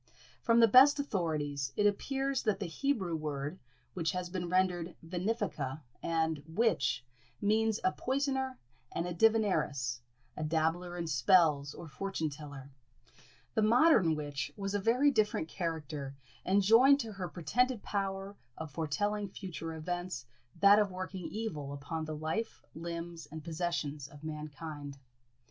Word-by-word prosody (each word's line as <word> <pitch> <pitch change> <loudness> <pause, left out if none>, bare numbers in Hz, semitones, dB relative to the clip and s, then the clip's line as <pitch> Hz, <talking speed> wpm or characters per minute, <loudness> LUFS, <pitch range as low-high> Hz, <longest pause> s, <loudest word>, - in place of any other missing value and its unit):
From 230 0 +4
the 230 - +8
best 270 +6 +7
authorities, 150 - -1
it 205 - +3
appears 270 +6 +1
that 210 -3 0
the 200 - -2
Hebrew 190 -2 -1
word, 150 +1 -4 0.3
which 170 -1 -1
has 180 -1 -3
been 180 -2 -3
rendered 180 -1 +1
venefica 170 - -2 0.2
and 160 -2 0
witch, 160 - +1 0.3
means 220 +1 +2
a 185 - +3
poisoner 265 +1 -1 0.3
and 170 - -2
divineress, 175 - +2 0.4
a 155 - -4
dabbler 165 +3 0
in 170 - -2
spells, 150 -1 +3
or 170 - -8
fortune 160 -1 -3
teller. 140 -2 -9 0.8
The 220 - +2
modern 225 - +5
witch 145 -2 -4
was 195 -1 -3
a 205 - +1
very 250 +8 +4
different 210 - +1
character, 155 -5 -4 0.3
and 195 +2 +3
joined 255 +7 +7
to 225 -2 -6
her 190 -3 -5
pretended 235 - 0
power 195 0 -3 0.2
of 160 -2 -6
foretelling 205 +7 -1
future 175 -4 -6
events 175 -3 -4 0.4
that 200 +1 +8
of 205 -2 +2
working 185 -1 -5
evil 155 -11 -4
upon 155 +3 -4
the 155 0 -4
life, 160 +9 -3
limbs, 170 -1 -6
and 155 +1 -8
possessions 160 -4 -2
of 145 +1 -15
mankind. 150 -2 -6
175 Hz, 140 wpm, -32 LUFS, 155-210 Hz, 0.8 s, the